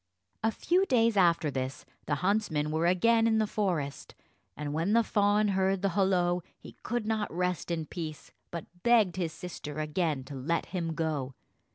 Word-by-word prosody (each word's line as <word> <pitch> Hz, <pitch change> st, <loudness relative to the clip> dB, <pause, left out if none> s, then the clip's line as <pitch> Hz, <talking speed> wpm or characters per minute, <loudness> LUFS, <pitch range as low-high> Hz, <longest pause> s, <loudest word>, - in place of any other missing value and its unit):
A 225 Hz, -, +2 dB
few 365 Hz, -, +1 dB
days 230 Hz, -3 st, +3 dB
after 170 Hz, -5 st, +3 dB
this, 130 Hz, 0 st, -4 dB, 0.2 s
the 145 Hz, -, +1 dB
huntsmen 170 Hz, -8 st, +1 dB
were 160 Hz, +2 st, +1 dB
again 225 Hz, +6 st, +4 dB
in 220 Hz, -1 st, +3 dB
the 215 Hz, -, +3 dB
forest; 170 Hz, -10 st, -2 dB, 0.4 s
and 145 Hz, -1 st, -4 dB
when 165 Hz, +7 st, 0 dB
the 230 Hz, 0 st, +5 dB
fawn 205 Hz, 0 st, +2 dB
heard 190 Hz, 0 st, +1 dB
the 200 Hz, -, +3 dB
holloa, 180 Hz, -2 st, +2 dB, 0.2 s
he -, -, -12 dB
could 240 Hz, -1 st, -2 dB
not 220 Hz, -1 st, -1 dB
rest 180 Hz, -1 st, -1 dB
in 165 Hz, -2 st, -2 dB
peace, 155 Hz, -3 st, -7 dB, 0.2 s
but 170 Hz, -2 st, -6 dB, 0.2 s
begged 220 Hz, -6 st, +4 dB
his 170 Hz, -3 st, -1 dB
sister 160 Hz, -4 st, -7 dB
again 155 Hz, -2 st, -1 dB
to 140 Hz, -, -10 dB
let 140 Hz, +6 st, -1 dB
him 170 Hz, -3 st, -3 dB
go. 150 Hz, -5 st, -2 dB
180 Hz, 175 wpm, -29 LUFS, 155-210 Hz, 0.4 s, the